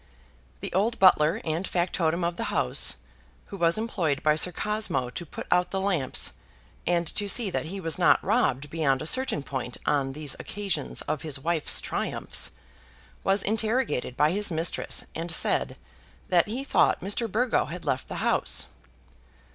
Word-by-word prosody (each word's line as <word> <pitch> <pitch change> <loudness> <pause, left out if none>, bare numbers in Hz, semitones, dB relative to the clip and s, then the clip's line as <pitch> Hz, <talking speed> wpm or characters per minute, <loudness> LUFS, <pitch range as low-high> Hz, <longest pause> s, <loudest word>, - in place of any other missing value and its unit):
The - - -5
old 215 +6 +1
butler 185 +1 +5
and 165 +3 -2
factotum 175 -1 0
of 170 0 0
the - - -3
house, 65 - +1 0.5
who 200 - -7
was 170 0 +2
employed 170 -10 -1
by 150 0 +4
Sir 180 +3 +1
Cosmo 190 - -1
to 175 - -6
put - - -7
out 180 0 +3
the 195 - -2
lamps 180 - 0 0.5
and 175 0 +2
to 205 - -1
see 220 -2 +2
that - - -2
he 195 +4 -5
was 165 -4 -1
not - - +5
robbed 140 +3 +1
beyond 150 -4 +1
a - - -6
certain 255 - +1
point 130 -3 -4
on 135 -2 +1
these 150 -1 -3
occasions 205 -2 -2
of 150 - -3
his 150 -3 -3
wife's 160 +2 +2
triumphs, - - 0 0.7
was 195 +1 +2
interrogated 220 - 0
by 150 +1 +4
his 205 +3 +1
mistress, 165 0 -1
and 165 +1 -4
said 165 - 0 0.5
that 175 0 +4
he 240 +6 -3
thought 275 - +2
Mr. 205 +3 -1
Burgo 240 +4 +2
had 175 +4 -7
left 130 - -1
the - - -6
house. - - +1
175 Hz, 165 wpm, -27 LUFS, 150-205 Hz, 0.7 s, butler